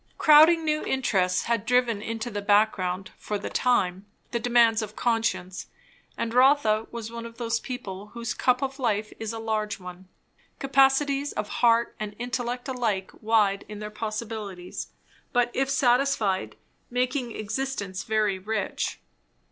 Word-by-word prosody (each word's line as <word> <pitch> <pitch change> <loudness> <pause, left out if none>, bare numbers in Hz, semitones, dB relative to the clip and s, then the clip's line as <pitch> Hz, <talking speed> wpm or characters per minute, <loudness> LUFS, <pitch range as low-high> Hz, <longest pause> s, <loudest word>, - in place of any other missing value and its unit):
Crowding 315 +2 +7
new 305 0 0
interests 190 -9 +1
had 230 -3 0
driven 240 -2 +2
into 225 +2 -4
the 205 -1 -3
background, 195 -3 +1
for 210 - -3
the - - -6
time, 200 -6 +1 0.2
the 235 - 0
demands 235 -1 +4
of 215 0 -6
conscience; 225 -6 -1 0.5
and 230 0 -2
Rotha 250 -4 +4
was 230 -1 -6
one 235 0 -6
of 230 0 -10
those 230 -1 -1
people 210 -7 -7
whose 235 +2 -5
cup 250 +1 +1
of 270 +1 -4
life 215 -4 -1
is 225 -1 -3
a 225 - -5
large 215 -2 -2
one; 180 0 -10 0.5
capacities 275 +1 +2
of 210 - -3
heart 235 -1 +3
and 210 -1 -5
intellect 245 +1 -3
alike 225 -7 -1
wide 215 -3 +2
in 210 - -7
their 210 0 -6
possibilities, 215 -4 -5 0.5
but 245 -1 +2
if 270 0 0
satisfied, 245 -7 +1 0.3
making 250 -1 -1
existence 210 -4 -3
very 215 -3 0
rich. 210 +1 -3
225 Hz, 145 wpm, -26 LUFS, 210-250 Hz, 0.5 s, Crowding